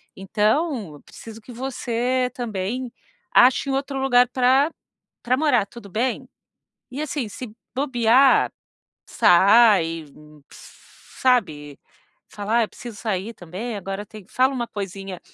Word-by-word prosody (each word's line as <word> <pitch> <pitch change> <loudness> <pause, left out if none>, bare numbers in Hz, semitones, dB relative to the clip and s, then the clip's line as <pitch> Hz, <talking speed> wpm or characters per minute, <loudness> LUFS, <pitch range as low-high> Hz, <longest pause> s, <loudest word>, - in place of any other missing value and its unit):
Então, 210 - -1
preciso 225 -1 -12
que 245 - -13
você 250 0 -2
também 235 +1 -4 0.4
ache 255 +2 +5
um 270 - 0
outro 275 0 -3
lugar 250 -2 +4
pra 260 +4 +3 0.5
pra 255 +2 +1
morar, 275 -9 +2
tudo 220 -1 -12
bem?". 235 +6 -2 0.6
E 275 - -5
assim, 275 -7 -4
se 230 0 -9 0.2
bobear, 260 -1 +3 0.6
sai, 185 -4 +4 0.4
sabe. 155 - -3 0.5
Fala: 210 +3 -1
"Ah, - - +3
eu - - -7
preciso 235 -3 -10
sair 210 +1 -3
também, 200 +6 -6
agora 195 +1 -6
tem". 215 -2 -12
Fala 260 +2 +2
uma 240 -2 -2
coisinha, 195 -3 -7
235 Hz, 120 wpm, -22 LUFS, 200-255 Hz, 0.6 s, ache